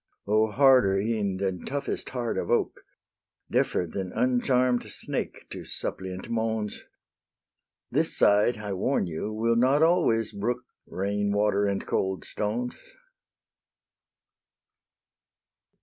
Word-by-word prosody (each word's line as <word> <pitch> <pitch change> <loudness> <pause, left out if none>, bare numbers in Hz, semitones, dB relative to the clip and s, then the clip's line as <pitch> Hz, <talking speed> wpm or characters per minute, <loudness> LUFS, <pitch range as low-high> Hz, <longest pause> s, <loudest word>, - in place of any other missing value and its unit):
O 110 +2 +3
harder 125 -4 +5
e'en 100 -2 -1
than 95 -2 -2
toughest 140 +1 -3
heart 120 -3 -2
of - - -3
oak, - - +1 0.7
Deafer 90 - +1
than 90 +2 -5
uncharm'd 125 0 +2
snake - - -5
to - - -6
suppliant 95 0 -4
moans! 110 -2 -2 1.1
This - - 0
side, 105 +3 +4
I 105 -2 -4
warn 100 +4 0
you, 85 +5 -4
will 115 +2 +1
not 130 +6 +4
always 160 - +3
brook 120 +5 -2 0.2
Rain 100 +2 -1
water 105 0 +2
and 100 -1 -2
cold 95 0 -1
stones. 120 +4 -2
110 Hz, 110 wpm, -27 LUFS, 100-125 Hz, 1.1 s, harder